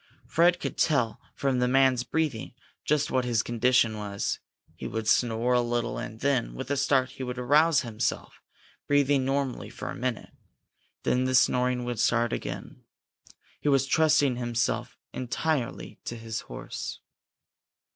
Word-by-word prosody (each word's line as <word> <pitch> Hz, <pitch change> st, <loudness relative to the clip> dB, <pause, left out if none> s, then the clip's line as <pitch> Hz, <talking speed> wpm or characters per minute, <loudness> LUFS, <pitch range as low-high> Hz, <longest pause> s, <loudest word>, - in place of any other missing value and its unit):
Fred 175 Hz, +2 st, +3 dB
could -, -, -4 dB
tell, 125 Hz, -8 st, +1 dB
from 135 Hz, -2 st, 0 dB
the 125 Hz, -, +2 dB
man's 130 Hz, -1 st, +3 dB
breathing, 130 Hz, -4 st, -2 dB, 0.3 s
just 150 Hz, 0 st, +1 dB
what 130 Hz, -1 st, +2 dB
his 120 Hz, -2 st, +1 dB
condition 120 Hz, -1 st, +2 dB
was. 100 Hz, -1 st, -3 dB, 0.4 s
He -, -, -6 dB
would 110 Hz, -1 st, -4 dB
snore 120 Hz, +1 st, +2 dB
a 125 Hz, -, +4 dB
little 120 Hz, 0 st, -1 dB
and 110 Hz, -1 st, -7 dB
then, 135 Hz, -3 st, 0 dB
with 130 Hz, +1 st, -5 dB
a -, -, +2 dB
start, 135 Hz, -1 st, +2 dB
he -, -, -10 dB
would 125 Hz, -1 st, -4 dB
arouse 150 Hz, +5 st, +4 dB
himself, 115 Hz, -3 st, -3 dB, 0.5 s
breathing 145 Hz, -2 st, +3 dB
normally 135 Hz, -1 st, -1 dB
for -, -, -6 dB
a -, -, -6 dB
minute. 125 Hz, -2 st, -3 dB, 0.7 s
Then 125 Hz, +1 st, +1 dB
the 130 Hz, 0 st, +1 dB
snoring 125 Hz, 0 st, +3 dB
would 120 Hz, -2 st, -3 dB
start 120 Hz, +1 st, +2 dB
again. -, -, -6 dB, 0.8 s
He 150 Hz, -, 0 dB
was 135 Hz, -1 st, +3 dB
trusting 145 Hz, -3 st, +3 dB
himself 120 Hz, -1 st, -1 dB, 0.2 s
entirely 130 Hz, +1 st, -2 dB
to 120 Hz, -, -4 dB
his 115 Hz, -1 st, -4 dB
horse. -, -, -6 dB
125 Hz, 150 wpm, -27 LUFS, 120-140 Hz, 0.8 s, a